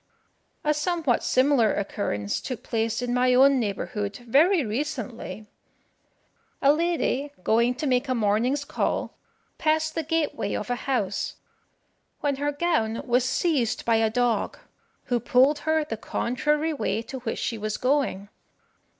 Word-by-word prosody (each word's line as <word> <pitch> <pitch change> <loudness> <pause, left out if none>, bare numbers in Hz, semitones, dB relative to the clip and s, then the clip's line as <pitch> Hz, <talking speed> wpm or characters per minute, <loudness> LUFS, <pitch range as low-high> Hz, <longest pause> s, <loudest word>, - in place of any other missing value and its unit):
A 300 - +2
somewhat 305 -4 0
similar 255 -4 +3
occurrence 105 - -2
took 250 -2 -6
place 225 +1 -1
in 245 0 -1
my 250 0 +3
own 270 +1 +6
neighbourhood, 205 -1 -3
very 310 - +4
recently. 235 -2 -4 1.1
A 280 +1 +5
lady, 315 -4 0
going 235 +3 +3
to 300 - -4
make 260 0 +1
a 255 - +1
morning's 235 +6 +1
call, - - -2 0.4
passed 315 0 +1
the 325 - -1
gateway 320 -1 -1
of - - -3
a - - +1
house, 205 -7 -1 0.8
when 285 -2 -1
her 290 +1 0
gown 285 -8 0
was 245 -1 +2
seized 260 -4 0
by 230 -1 +3
a 225 0 +2
dog, 245 0 0 0.5
who 245 -1 0
pulled 260 +5 +3
her 315 -1 +1
the 225 -6 -4
contrary 300 +8 -1
way 220 -5 -1
to 265 +2 -7
which 235 -2 -4
she 230 - -3
was 215 0 -2
going. 255 -7 0
255 Hz, 140 wpm, -25 LUFS, 225-295 Hz, 1.1 s, own